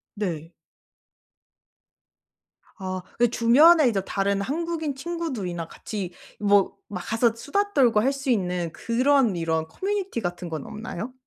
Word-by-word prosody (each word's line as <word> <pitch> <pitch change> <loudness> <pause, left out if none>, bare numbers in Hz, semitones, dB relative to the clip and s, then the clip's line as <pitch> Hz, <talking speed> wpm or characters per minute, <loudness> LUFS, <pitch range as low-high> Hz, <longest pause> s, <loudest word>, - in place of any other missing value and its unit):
네. 170 -6 -4 2.3
아. 185 -1 -4 0.2
이 240 - +5
주변에 270 +7 +6
이제 205 -5 0
다른 200 0 0
한국인 315 +4 -2
친구들이나 265 - -4
같이 195 -5 -6 0.3
뭐 205 -2 +4 0.2
막 180 - -3
가서 225 +4 +1
수다 405 - -1
떨고 240 -6 +4
할 270 +4 +2
수 275 0 -6
있는 180 -7 0
그런 250 -2 +2
이런 160 -1 -1
커뮤니티 390 - -3
같은 175 -2 -4
건 155 -3 -5
없나요? 220 +2 -6
225 Hz, 245 characters per minute, -25 LUFS, 180-275 Hz, 2.3 s, 주변에